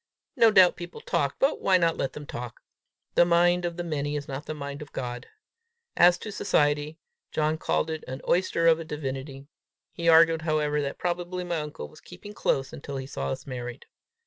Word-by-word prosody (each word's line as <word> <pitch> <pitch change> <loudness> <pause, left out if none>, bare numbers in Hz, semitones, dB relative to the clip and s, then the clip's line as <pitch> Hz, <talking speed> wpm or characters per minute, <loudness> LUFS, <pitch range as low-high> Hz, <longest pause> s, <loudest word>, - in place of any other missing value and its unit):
No 230 - +6
doubt 185 -4 +6
people 175 -1 -8
talked, 140 -1 -1
but 275 - +1
why 190 -1 +4
not 165 -2 +2
let 135 - -2
them 150 - -8
talk? 120 -2 -7 0.5
The - - +6
mind 175 +1 +3
of 170 0 -3
the 175 - -2
many 150 -3 -2
is 145 -1 -4
not 140 +2 -6
the 155 - -4
mind 140 -1 -6
of 150 - -9
God! 125 -1 -5 0.7
As 175 0 +6
to 215 - -7
society, 150 -5 +1 0.3
John 155 0 0
called 160 - 0
it 160 -1 -5
an 130 +1 -5
oyster 175 -2 +2
of 165 -1 +5
a - - -4
divinity. 135 -2 -6 0.5
He 170 0 0
argued, 165 0 +6
however, 150 -2 0
that 140 -1 -4
probably 180 +1 -3
my 175 -2 -2
uncle 150 -1 -6
was 155 - -17
keeping 205 +4 -11
close 135 -9 -1
until 140 -1 -6
he 130 - -5
saw 70 - -4
us - - -5
married. 125 -2 -6
155 Hz, 200 wpm, -27 LUFS, 140-175 Hz, 0.7 s, No